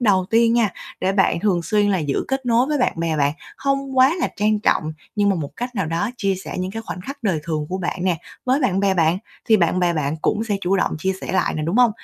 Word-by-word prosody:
đầu 195 -6 +3
tiên 230 0 +4
nha, 230 -4 +3 0.3
để 190 +1 +1
bạn 190 -3 +2
thường 185 -4 +1
xuyên 210 +3 +2
là 190 - +2
giữ 145 -4 -1
kết 270 -1 -2
nối 240 +1 +3
với 295 0 0
bạn 250 - +2
bè 165 -1 -1
bạn, 145 -1 +2 0.2
hông 275 -1 -1
quá 260 +1 +7
là - - +1
trang 210 +1 +2
trọng 155 -6 +1 0.2
nhưng 205 -1 +3
mà 195 - +3
một 150 -4 -4
cách 245 +1 -4
nào 195 -6 -1
đó 170 +7 -1
chia 195 -4 0
sẻ 190 - -7
những 185 +1 -2
cái 225 +3 -5
khoảnh 195 - -6
khắc 275 +8 -8
đời 185 -8 0
thường 155 -2 -2
của 185 +1 -3
bạn 180 0 -3
nè, 180 -3 +2 0.3
với 260 +2 +2
bạn 195 -8 +1
bè 195 -1 +2
bạn, 165 0 +2 0.3
thì 225 -3 +5
bạn 180 -1 +2
bè 175 -1 +2
bạn 150 -1 -1
cũng 220 - +1
sẽ 210 -3 -1
chủ 195 +1 +1
động - - +1
chia 190 +4 0
sẻ - - -5
lại 190 - +1
nè, 155 - -2
đúng 165 +7 -1
hông? 245 -2 +6
195 Hz, 275 wpm, -21 LUFS, 170-230 Hz, 0.3 s, quá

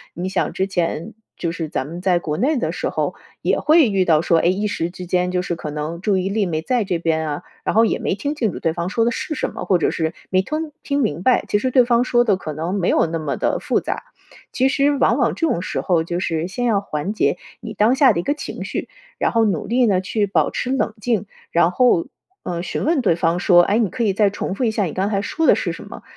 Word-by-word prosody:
你 180 +2 -3
想 - - -1
之 190 - 0
前 175 +1 -2 0.2
就 170 - -2
是 165 -2 -4
咱 130 - -3
们 170 +3 -7
在 180 -2 +2
国 155 -3 -3
内 280 +8 +1
的 245 - -1
时 - - -2
候， - - -2 0.3
也 - - +1
会 310 -5 +5
遇 195 -2 +2
到 160 -4 +3
说， 165 0 +3
哎， - - -1
一 195 +4 +1
时 170 -5 -2
之 180 +1 -9
间 180 +1 0
就 180 0 0
是 180 -1 -3
可 155 -2 -6
能 155 +3 -4
注 200 0 +1
意 185 0 -1
力 205 0 0
没 160 -3 -2
在 245 +6 0
这 185 -4 -2
边 160 -1 0
啊， 145 +4 -4 0.2
然 - - -1
后 225 +2 +5
也 - - 0
没 - - -1
听 285 +9 -3
清 230 -8 0
楚 - - -7
对 165 - 0
方 170 +1 -3
说 225 +3 +1
的 235 - +2
是 310 +5 -4
什 - - -2
么， - - -5
或 185 - +3
者 165 - +1
是 160 -1 -2 0.2
没 185 -1 +3
吞 310 +8 -4
听 280 0 -1
明 175 - -1
白。 255 - +3
其 - - +2
实 255 +5 -1
对 250 -1 +5
方 240 0 +3
说 240 -1 +3
得 205 -4 +3
可 180 -4 -6
能 165 +6 -3
没 185 -3 0
有 - - +3
那 165 0 -3
么 155 -3 -3
地 - - 0
复 - - 0
杂。 - - -4 0.5
其 260 - +2
实， 280 +1 +2
往 240 - +3
往 240 -4 +2
这 330 - 0
种 175 - 0
时 185 - -3
候 170 -3 +1
就 175 +1 -3
是 165 -2 -1
先 245 +6 -3
要 215 -4 +2
缓 155 0 -3
解 220 - +1 0.2
你 225 -2 -7
当 215 +5 +3
下 270 -2 +6
的 170 - -1
一 - - -2
个 285 - +1
情 295 - -6
绪， - - -4 0.3
然 - - +1
后 230 -1 +3
努 190 -8 -1
力 245 +2 +2
呢 190 -4 +2
去 205 +2 -1
保 195 - +1
持 245 - -3
冷 270 - 0
静， 220 -3 0 0.3
然 170 0 +3
后， 210 -4 +3 0.4
呃， 170 -1 -3
询 180 - -3
问 310 -2 +2
对 195 -8 +2
方 170 +1 +1
说： 175 -2 +6
“哎， 210 +3 +2
你 220 -5 +1
可 245 +3 -3
以 205 -3 +2
再 205 +1 +3
重 195 - -4
复 225 - -3
一 235 - +3
下 215 -1 0
你 170 - -3
刚 195 +2 0
才 200 -1 -1
说 320 +9 -1
的 - - +7
是 - - -2
什 - - -9
么？” - - -11
195 Hz, 300 characters per minute, -20 LUFS, 170-235 Hz, 0.5 s, 的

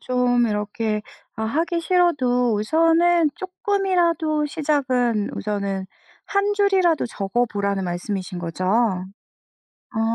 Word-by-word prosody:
좀 245 -1 +2
이렇게 210 0 -2 0.3
아 220 - -2
하기 330 +9 0
싫어도 260 -10 +2
우선은 330 +6 +3
쪼끔이라도 360 -5 0
시작은 260 -8 0
우선은 200 -2 -3 0.4
1 405 +1 +1
줄이라도 385 -7 +2
적어 230 +2 -1
보라는 200 -3 -2
말씀이신 180 +1 -4
거죠? 175 +1 -4 1.3
어. 220 - -1
250 Hz, 235 characters per minute, -22 LUFS, 210-335 Hz, 1.3 s, 우선은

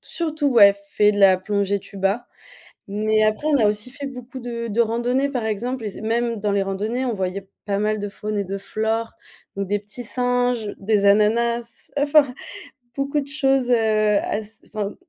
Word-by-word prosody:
surtout 315 -3 -3
ouais 200 -6 +7
fait 210 +1 +3
de 205 - -3
la 190 -2 +6
plongée 200 +1 -1
tuba, 195 +4 -2 0.6
mais 215 +2 +1
après 215 +7 +1
on 300 -2 +4
a 225 - +3
aussi 210 +4 -1
fait 285 +2 -8
beaucoup 255 0 -8
de 235 -1 -5
de 225 +3 0
randonnées 245 +5 0
par 250 -5 -2
exemple 230 +3 -2
et - - -1
c 200 - -10
même 230 +1 0
dans 205 0 -1
les 200 - +2
randonnées 215 +7 -2
on 240 - -1
voyait 190 0 -3 0.2
pas 200 -1 -1
mal 215 +1 0
de 205 0 -4
faune 210 +1 -5
et 200 - -1
de 195 +1 -4
flore 220 +3 -2 0.4
ou 200 - -1
des 205 +2 0
petits 210 +4 -6
singes, 245 -2 0
des 200 0 +1
ananas, 235 +3 +2
enfin 285 -2 +4 0.6
beaucoup 280 +1 0
de 280 - -5
choses, 270 -3 +1
heu, 245 - +5 0.4
as 215 +1 -5
enfin 210 -1 -3
220 Hz, 185 wpm, -22 LUFS, 205-245 Hz, 0.6 s, ouais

